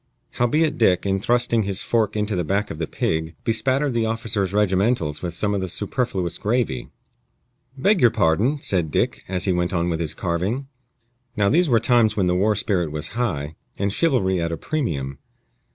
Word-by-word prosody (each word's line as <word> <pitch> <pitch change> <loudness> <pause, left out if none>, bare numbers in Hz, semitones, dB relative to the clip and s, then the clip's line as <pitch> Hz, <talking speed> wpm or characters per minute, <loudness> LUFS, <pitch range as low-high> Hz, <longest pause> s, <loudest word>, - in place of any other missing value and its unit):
Howbeit 150 +6 +1
Dick, 95 -6 +3
in 95 0 +1
thrusting 120 +1 +2
his 100 -1 -2
fork 110 -3 0
into 105 -1 -1
the 90 - 0
back 100 +5 -1
of 75 - -7
the 80 - -2
pig, 80 0 -2
bespattered 130 +4 +1
the 115 -1 +1
officer's 110 -4 -1
regimentals 95 -5 +1
with 85 -2 -3
some 105 +3 0
of 100 - -1
the 95 - -2
superfluous 95 -3 -2
gravy. 105 - -1 0.9
"Beg 195 +7 +2
your 120 - +7
pardon," 110 - +1
said 90 -5 0
Dick, - - 0
as 95 -1 -1
he 95 - +2
went 90 +1 -1
on 85 0 0
with 80 - -2
his 80 -2 -2
carving. 95 +10 -2 0.7
Now 100 -1 +3
these 170 - +3
were 115 -2 +4
times 115 -2 +3
when 95 - +2
the 90 - +2
war 105 +4 +2
spirit 95 -7 0
was 75 0 -4
high, 90 -11 -2 0.2
and 100 0 -1
chivalry 100 - +1
at 85 0 -1
a 85 - -3
premium. 70 - -3
100 Hz, 185 wpm, -22 LUFS, 85-120 Hz, 0.9 s, your